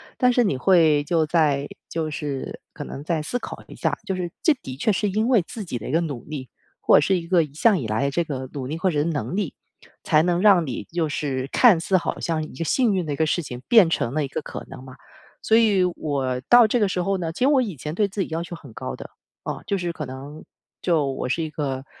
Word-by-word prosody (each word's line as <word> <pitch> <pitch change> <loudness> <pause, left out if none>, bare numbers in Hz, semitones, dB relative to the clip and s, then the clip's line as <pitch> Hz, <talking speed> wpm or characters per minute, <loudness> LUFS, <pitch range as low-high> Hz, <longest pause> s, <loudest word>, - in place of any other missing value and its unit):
但 250 -1 +3
是 245 0 +3
你 170 -10 +1
会 160 -2 +4
就 165 -1 +2
再 150 -3 +1 0.2
就 160 -2 -3
是 145 -3 -5
可 - - -7
能 140 - -8
再 160 +1 -1
思 245 +10 -2
考 - - -8
一 - - -11
下， - - -1
就 190 - -2
是 180 -1 -3
这 315 - +5
的 130 - -9
确 215 - +1
是 205 +2 0
因 215 +4 0
为 245 -5 +4
自 215 -3 -7
己 125 -8 -4
的 110 - -7
一 - - -3
个 165 +3 +2
努 145 -8 -4
力 135 -6 -7 0.3
或 - - +6
者 - - +5
是 190 +5 +2
一 170 - -5
个 175 -2 +4
一 150 - -9
向 205 +2 +4
以 115 - -4
来 110 +5 0
的 140 - 0
这 170 - +1
个 130 -5 -5
努 135 -3 -4
力 155 +4 -4
或 185 +2 +1
者 145 -2 +1
能 165 +2 -2
力， 200 -7 -2 0.5
才 155 - +4
能 175 +1 +1
让 185 -5 +5
你 125 - -4
就 165 +5 -2
是 135 -3 -2
看 225 -9 +6
似 185 +3 +2
好 175 - -3
像 160 -2 -1
一 155 - -9
个 165 - -3
幸 225 - +2
运 180 -4 -1
的 145 - -1
一 - - -2
个 160 - +1
事 165 +3 0
情 125 -5 -8
变 220 -8 +6
成 120 -7 -1
了 155 0 0
一 - - -2
个 145 - -5
可 - - -7
能 130 - -10
嘛。 130 -1 -12 0.5
所 220 - +3
以 210 -5 +4
我 140 -7 -2
到 240 -1 +8
这 230 +3 +1
个 210 - +3
时 180 -1 -1
候 195 +1 0
呢， 165 -2 -2
其 - - -10
实 255 - +4
我 275 -2 +4
以 205 -8 -3
前 150 +4 -5
对 205 +3 +1
自 200 +1 -4
己 - - -1
要 165 +1 -2
求 175 - -7
很 140 -8 -13
高 130 +3 -5
的， - - -10 0.3
啊， - - -5
就 200 - 0
是 175 -2 -3
可 155 - -6
能 135 +4 -9 0.4
就 165 -5 +2
我 130 - -4
是 165 +6 0
一 155 - -5
个 135 -3 -3
165 Hz, 290 characters per minute, -23 LUFS, 140-190 Hz, 0.5 s, 到